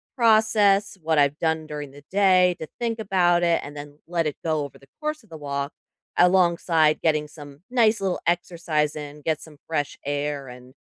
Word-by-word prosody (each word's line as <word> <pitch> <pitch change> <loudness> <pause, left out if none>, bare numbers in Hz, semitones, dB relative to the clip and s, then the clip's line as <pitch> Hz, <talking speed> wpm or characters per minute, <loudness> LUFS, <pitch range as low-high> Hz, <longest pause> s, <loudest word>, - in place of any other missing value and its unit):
process 215 -4 +4
what 160 -1 0
I've 145 +1 +3
done 160 -1 0
during 150 -2 -6
the 145 +1 -15
day, 185 -2 +4
to 160 - -6
think 230 -1 -2
about 180 -4 +2
it, 170 -1 +3
and 145 +1 -9
then 145 0 -9
let 170 -2 0
it 150 - -4
go 155 -2 0
over 140 - -12
the 135 0 -21
course 305 -3 -3
of 220 - -24
the 160 - -9
walk 140 -1 -3 0.4
alongside 170 -3 +3
getting 155 -2 +1
some 145 -1 -13
nice 225 -3 +3
little 190 -2 -1
exercise 170 -3 0
in, 150 0 -8
get 160 -2 -1
some 150 -3 -13
fresh 145 -3 -2
air, 145 -1 -2
and 125 +1 -13
160 Hz, 185 wpm, -24 LUFS, 145-185 Hz, 0.4 s, process